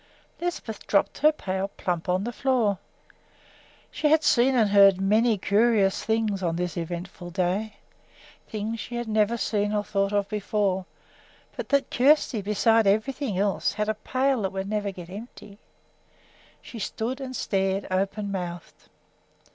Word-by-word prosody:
Lisbeth 340 -11 -5
dropped 200 - +1
her 305 +1 +6
pail 190 -9 -3
plump 180 -3 -4
on 185 +2 +1
the 240 - -3
floor. 235 -7 +1 1.1
She 305 - 0
had 315 +1 +4
seen 255 0 +4
and 220 -4 +3
heard 195 -2 +6
many 215 +3 +3
curious 200 0 +2
things 220 -3 0
on 170 -2 -1
this 175 -2 -3
eventful 175 +1 -6
day, 190 +4 -1 0.7
things 220 +1 -4
she 240 - -6
had 240 -1 -3
never 215 +1 +2
seen 210 -2 0
or 210 -1 0
thought 200 -1 -1
of 205 -1 0
before; 200 -2 -1 0.7
but - - -6
that 280 -1 +1
Kjersti, 260 -3 +3
besides 210 +2 +3
everything 220 +2 0
else, 200 0 0
had 210 0 -2
a - - +2
pail 255 +3 0
that 190 -2 -1
would 190 0 -4
never 210 -1 -1
get 180 -3 -9
empty! 205 -1 -10 1.0
She 230 - -9
stood 235 +6 -3
and 260 -1 -6
stared, 195 -2 -1
open 200 +2 -1
mouthed. 175 -3 -6
205 Hz, 150 wpm, -26 LUFS, 195-230 Hz, 1.1 s, her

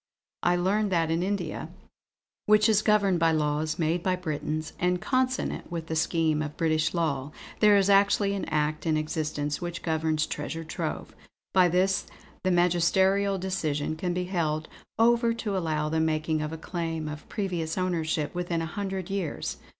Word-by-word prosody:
I 175 - +3
learn 200 +4 +1
that 165 -3 +1
in 165 +1 +1
India, 200 +2 -2 0.8
which 210 0 +6
is 215 -2 +4
governed 205 -4 +3
by 165 0 +4
laws 155 0 0
made 165 +1 0
by 185 +1 +1
Britons 155 -2 -3
and 180 0 +1
consonant 255 -2 -1
with 165 -2 -4
the 160 - -3
scheme 160 -1 +1
of 150 -1 -5
British 155 0 +1
law, 145 -4 -1 0.3
there 210 -1 +6
is 195 -1 +3
actually 200 0 +4
an 200 - -2
act 155 +2 -1
in 155 -1 +2
existence 150 -1 -2
which 175 -1 -5
governs 160 -1 0
Treasure 165 0 -4
Trove. 160 - -4 0.4
By 185 -1 +6
this, 185 +2 +1 0.4
the 185 - +2
magisterial 185 +3 +3
decision 155 -5 -2
can 175 +3 -2
be 180 +1 -1
held 160 -4 -1 0.3
over 235 0 +3
to 210 -3 -3
allow 155 -4 0
the 160 +1 0
making 155 0 0
of 150 0 -3
a 160 - -5
claim 165 -2 -3
of 150 0 -8
previous 175 -5 -2
ownership 165 -4 -1
within 175 -2 -2
a 160 - -6
hundred 195 -2 -4
years. 195 -6 -3
170 Hz, 165 wpm, -27 LUFS, 155-190 Hz, 0.8 s, which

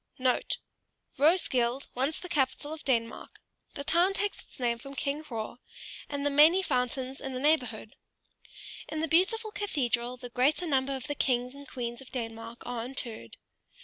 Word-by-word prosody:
* 255 0 -3
*Roeskilde, 275 -5 +3
once 270 +5 0
the 360 - -7
capital 295 -1 0
of 315 - -8
Denmark. 235 -3 -1 0.4
The 280 - -4
town 350 +6 +3
takes 410 +1 0
its - - -18
name 235 -2 +1
from 275 +2 -9
King 285 +2 -1
Hroar, 235 -4 -5 0.5
and 285 -1 -2
the 290 - +3
many 315 +7 +7
fountains 255 -1 -1
in 265 -1 -4
the - - -2
neighborhood. 250 -7 +1 0.9
In 310 0 -2
the 325 - +1
beautiful 410 +7 +3
cathedral 250 - -1
the 245 -1 -8
greater 280 +8 +2
number 275 -3 +1
of 260 - -6
the 290 - -2
kings 250 -2 +1
and 280 0 -11
queens 240 -1 -4
of 265 - -13
Denmark 230 -1 -5
are 245 -2 -3
interred. 235 - -4
265 Hz, 165 wpm, -30 LUFS, 245-305 Hz, 0.9 s, many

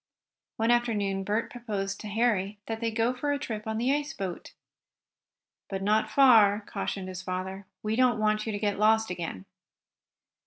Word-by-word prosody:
One 225 +1 +2
afternoon 205 -5 +1
Bert 210 +4 -1
proposed 205 -5 -4
to 215 - -7
Harry 210 -2 0
that 225 -1 -4
they 230 -1 0
go 225 +2 +1
for 285 +3 -2
a 285 - +1
trip 220 -5 -5
on 220 0 -2
the 250 +4 +2
ice 295 0 -3
boat. 185 -3 -5 1.2
"But 195 -1 -3
not 215 +2 +3
too - - -13
far," 220 -7 +6
cautioned 190 -2 -4
his 185 0 -6
father. 190 +1 -5 0.2
"We 215 +1 0
don't 250 -1 +3
want 215 0 +1
you - - -1
to 205 - -2
get 205 -1 -1
lost 220 0 +3
again." 165 - -5
215 Hz, 180 wpm, -28 LUFS, 195-230 Hz, 1.2 s, far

